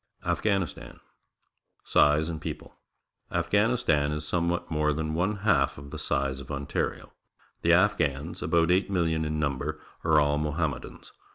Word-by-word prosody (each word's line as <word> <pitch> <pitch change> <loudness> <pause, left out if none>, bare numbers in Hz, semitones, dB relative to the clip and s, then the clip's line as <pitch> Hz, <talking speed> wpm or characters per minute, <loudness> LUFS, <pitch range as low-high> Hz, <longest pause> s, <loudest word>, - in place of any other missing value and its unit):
AFGHANISTAN 100 -5 -1
c - - -21 0.8
Size 75 +2 +3
and 80 -2 -5
People. - - -7 0.3
— - - -43
Afghanistan 100 -6 +2
is 75 0 -4
some 85 0 0
what 85 -1 -3
more 75 -1 +1
than 80 +1 -2
one 90 +6 0
half 100 -4 +3
of 70 0 -10
the - - -6
size 70 -1 -1
of 70 - -10
Ontario. 70 0 -3 0.5
The - - +4
Afghans, 70 +4 +1
about 85 0 +2
eight 95 +3 +2
million 80 -4 0
in 75 0 -2
number, 75 +1 -2 0.2
are 80 -2 +4
all 75 0 +2
Mohammedans. 75 0 -3
80 Hz, 155 wpm, -27 LUFS, 75-85 Hz, 0.8 s, The